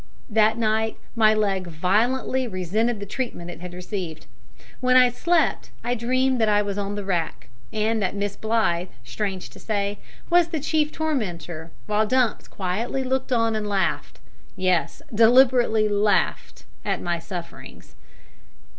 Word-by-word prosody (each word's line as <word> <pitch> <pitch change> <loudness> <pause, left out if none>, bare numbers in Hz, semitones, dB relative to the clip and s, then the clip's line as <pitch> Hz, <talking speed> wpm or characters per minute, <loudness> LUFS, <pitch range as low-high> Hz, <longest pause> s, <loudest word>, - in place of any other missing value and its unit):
That 220 +1 +4
night 220 0 0 0.2
my 215 -2 +5
leg 195 -4 0
violently 230 +10 +1
resented 210 +4 -1
the 200 - -5
treatment 205 -5 -4
it 165 - -11
had 180 0 -7
received. 180 -4 -5 0.5
When 255 0 +3
I 250 -1 +6
slept 340 +6 +1
I 240 +1 0
dreamed 255 +1 +1
that 220 - +3
I 205 0 +3
was 200 -1 -3
on 200 0 -3
the 205 -1 -5
rack, 175 -4 -2 0.2
and 220 +1 0
that 190 0 -1
Miss 200 0 -2
Blythe, 215 -6 0 0.2
strange 190 - -4
to - - -13
say, 205 -1 -2 0.3
was 350 -1 +4
the 330 -2 -3
chief 300 +1 0
tormentor, 175 - -3 0.2
while 210 +1 +1
Dumps 255 -1 +1
quietly 210 +8 -2
looked 260 +1 -1
on 230 -2 +2
and 215 -1 -2
laughed 195 -2 -1 0.4
yes, 185 -2 0
deliberately 235 -1 +5
laughed 205 -1 0 0.2
at - - -1
my 175 -1 -2
sufferings. 175 -1 -9
215 Hz, 145 wpm, -24 LUFS, 190-245 Hz, 0.5 s, I